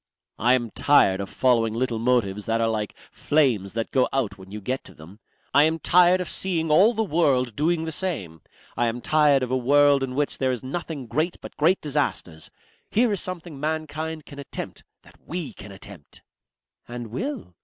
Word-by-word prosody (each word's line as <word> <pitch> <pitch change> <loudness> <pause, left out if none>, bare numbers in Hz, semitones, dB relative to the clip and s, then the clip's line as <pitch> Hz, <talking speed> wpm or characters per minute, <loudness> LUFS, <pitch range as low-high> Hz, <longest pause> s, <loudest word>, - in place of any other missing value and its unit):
"I 120 +3 +4
am 120 -3 -3
tired 100 -9 +3
of 100 - -6
following 115 -4 +2
little 120 -2 -1
motives 110 -4 0
that 115 0 +1
are 115 - +2
like 110 -2 -3
flames 125 -11 +1
that 115 0 -3
go 130 -2 +2
out 120 -8 -1
when 95 -1 -14
you 105 +2 -6
get 130 +6 -3
to - - -13
them. 85 +7 -14 0.3
I 145 +2 +6
am 160 +1 +1
tired 180 +2 +4
of 180 - -3
seeing 165 -4 -2
all 205 +10 +5
the 220 - +1
world 140 - +1
doing 160 +2 +1
the 160 - -4
same. 120 - -4 0.3
I 120 - +1
am 115 +1 -2
tired 150 -3 +3
of 125 - -3
a - - +2
world 140 +2 +4
in 130 -1 -3
which 145 +1 -1
there 130 -1 +1
is 125 -1 -4
nothing 145 0 -5
great 155 +8 -1
but - - -11
great 170 +5 +2
disasters. 140 - -2 0.4
Here 235 +1 +2
is 200 - 0
something 175 -5 -6
mankind 155 +1 -3
can 140 - -11
attempt, 140 - -7 0.2
that - - -20
we 170 -3 -5
can 105 - -11
attempt." 95 -5 -13 0.6
"And 120 -2 -7
will?" 245 - -5
135 Hz, 195 wpm, -24 LUFS, 115-160 Hz, 0.6 s, I